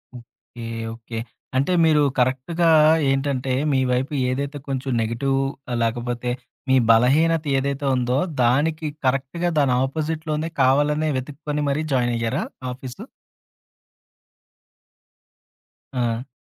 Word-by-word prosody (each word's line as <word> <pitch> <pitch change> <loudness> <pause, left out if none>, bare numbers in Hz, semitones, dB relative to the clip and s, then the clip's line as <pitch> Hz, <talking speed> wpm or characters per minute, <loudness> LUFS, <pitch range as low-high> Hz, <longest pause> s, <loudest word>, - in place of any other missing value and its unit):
Okay. 120 0 -12 0.3
Okay. 115 0 -8 0.4
అంటే 140 +7 +1
మీరు 155 -2 +4 0.2
కరెక్ట్‌గా 130 +7 +1 0.4
ఏంటంటే 135 -1 -1 0.2
మీ 135 - +3
వైపు 130 +4 -1 0.2
ఏదైతే 140 +3 -3
కొంచెం 135 0 -3
నెగెటివ్ 130 +5 0 0.4
లేకపోతే 120 +1 -1 0.4
మీ 130 - +5
బలహీనత 150 +8 +4
ఏదైతే 140 +1 -2
ఉందో 125 +1 0 0.3
దానికి 155 +6 +1 0.2
కరెక్ట్‌గా 135 +7 0
దాని 135 -3 +3
అపోజిట్‌లోనే 155 +2 -3
కావాలనే 145 +4 +3
వెతుక్కొని 150 +2 -4
మరి 150 +3 0
జాయినయ్యారా 120 +1 0 0.3
ఆఫీసు? 125 0 -8 2.9
ఆ! 120 0 -1
135 Hz, 95 wpm, -22 LUFS, 125-150 Hz, 2.9 s, మీ